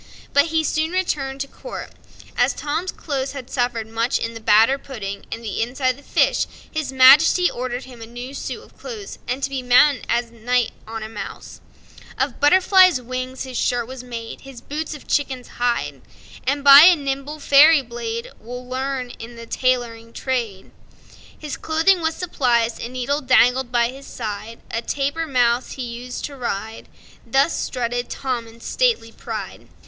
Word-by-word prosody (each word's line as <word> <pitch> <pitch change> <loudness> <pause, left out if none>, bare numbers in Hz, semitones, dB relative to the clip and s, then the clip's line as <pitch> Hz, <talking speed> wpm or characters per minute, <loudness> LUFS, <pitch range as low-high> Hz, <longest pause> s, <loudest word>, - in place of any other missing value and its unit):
But 285 +1 +5
he 320 0 +1
soon 315 +2 -1
returned 275 -7 -1
to 275 - -3
court. - - -8 0.4
As - - +2
Tom's 325 +5 -2
clothes 275 -3 -4
had 265 -2 -8
suffered 245 -3 -1
much 230 +3 0
in 230 - -4
the 225 - -8
batter 225 +5 +4
pudding 200 -8 -7
and 230 - -5
the 215 -2 -3
inside 255 +3 0
of 255 - -9
the - - -15
fish, - - +1 0.2
his 310 -4 -3
Majesty 285 +7 +6
ordered 250 +1 -4
him 250 -3 -12
a 225 - -8
new 245 +3 -8
suit - - -5
of - - -20
clothes, 435 -5 -8
and 255 +3 -3
to 275 - 0
be 270 -1 -2
mounted 250 +3 +4
as 235 0 0
a - - -21
knight 245 +1 0 0.2
on 225 0 -5
a - - -5
mouse. 225 - -8 0.6
Of 270 -2 -1
Butterfly's 370 +1 +5
wings 255 +1 -5
his 260 -2 -4
shirt 240 -1 0
was 255 +1 -9
made, 230 -2 -7
His 270 -3 -11
boots 305 +3 -5
of 295 - -13
chicken's 265 -3 -1
hide; 240 -1 -1 0.5
And 280 +1 0
by 280 0 +11
a 360 0 +8
nimble 280 +1 -4
fairy 290 +1 +6
blade, 235 -1 -5
Well 245 +2 -8
learned 260 -1 -3
in 235 +1 -9
the 230 0 -9
tailoring 235 -2 -1
trade, 235 -7 -3 0.7
His 300 -2 -6
clothing 330 +4 +2
was 320 0 0
supplied. 240 -9 +1
A 235 - -5
needle 255 +4 -2
dangled 255 -1 +3
by 240 -1 +2
his 270 +2 -11
side; 220 0 -6
A 230 - -1
dapper 285 +6 -2
mouse 245 -2 +1
he 260 - -5
used 245 +1 -6
to 285 - -7
ride, 225 -3 -5 0.4
Thus 275 +5 +2
strutted 245 -1 -2
Tom 250 -4 -3
in 230 +1 -16
stately 465 - 0
pride! - - -7
255 Hz, 175 wpm, -21 LUFS, 235-280 Hz, 0.7 s, by